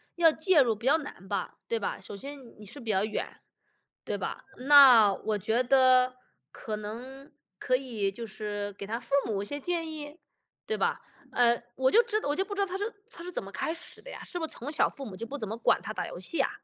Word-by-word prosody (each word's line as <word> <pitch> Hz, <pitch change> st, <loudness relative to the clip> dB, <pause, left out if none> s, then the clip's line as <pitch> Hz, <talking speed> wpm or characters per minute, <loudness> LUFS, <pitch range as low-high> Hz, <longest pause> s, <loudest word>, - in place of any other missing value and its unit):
要 335 Hz, -1 st, +6 dB
介 320 Hz, -1 st, +4 dB
入 235 Hz, -4 st, +2 dB
比 215 Hz, -, -11 dB
较 275 Hz, -, +5 dB
难 285 Hz, -, -9 dB
吧， 200 Hz, -, -3 dB
对 230 Hz, -, -1 dB
吧？ 200 Hz, -, -3 dB
首 -, -, -9 dB
先 280 Hz, +8 st, -8 dB, 0.2 s
你 210 Hz, -, -10 dB
是 205 Hz, -, -8 dB
比 225 Hz, -2 st, -2 dB
较 195 Hz, 0 st, +2 dB
远， 215 Hz, -, -2 dB, 0.8 s
对 -, -, -3 dB
吧？ -, -, -5 dB, 0.2 s
那 255 Hz, -8 st, +9 dB
我 210 Hz, +2 st, -2 dB
觉 220 Hz, +5 st, +1 dB
得， 255 Hz, 0 st, +5 dB, 0.4 s
可 215 Hz, -, -5 dB
能 245 Hz, +7 st, -8 dB, 0.3 s
可 255 Hz, +6 st, +1 dB
以 225 Hz, -7 st, -2 dB
就 230 Hz, +3 st, -7 dB
是 205 Hz, -1 st, -5 dB
给 200 Hz, -, -8 dB
他 225 Hz, +3 st, -3 dB
父 275 Hz, -, -11 dB
母 205 Hz, -3 st, -1 dB
一 -, -, -4 dB
些 285 Hz, -, -4 dB
建 330 Hz, +2 st, -2 dB
议， 300 Hz, 0 st, -7 dB, 0.5 s
对 440 Hz, -, -1 dB
吧？ -, -, 0 dB, 0.3 s
呃， 240 Hz, -1 st, +4 dB
我 260 Hz, 0 st, +3 dB
就 465 Hz, -, +6 dB
知 430 Hz, -2 st, 0 dB
道 -, -, -4 dB
我 290 Hz, -, +1 dB
就 385 Hz, -, +1 dB
不 410 Hz, +1 st, -7 dB
知 405 Hz, -, -5 dB
道 400 Hz, -, +3 dB
他 380 Hz, 0 st, -4 dB
是 400 Hz, -, -2 dB, 0.3 s
他 340 Hz, -, -10 dB
是 360 Hz, -, -6 dB
怎 -, -, -3 dB
么 195 Hz, -, -9 dB
开 200 Hz, +10 st, -2 dB
始 345 Hz, +2 st, -10 dB
的 -, -, -10 dB
呀， -, -, -8 dB
是 -, -, -6 dB
不 330 Hz, -, -2 dB
是 -, -, -1 dB
从 250 Hz, -, -7 dB
小 300 Hz, -, +2 dB
父 275 Hz, -, -8 dB
母 205 Hz, -6 st, -8 dB
就 225 Hz, -, -6 dB
不 275 Hz, +5 st, -6 dB
怎 220 Hz, -6 st, -3 dB
么 220 Hz, +3 st, -4 dB
管 235 Hz, -, +2 dB
他 215 Hz, -, -5 dB
打 -, -, -3 dB
游 -, -, -8 dB
戏 185 Hz, -, -1 dB
啊？ -, -, +1 dB
255 Hz, 270 characters per minute, -29 LUFS, 215-310 Hz, 0.8 s, 那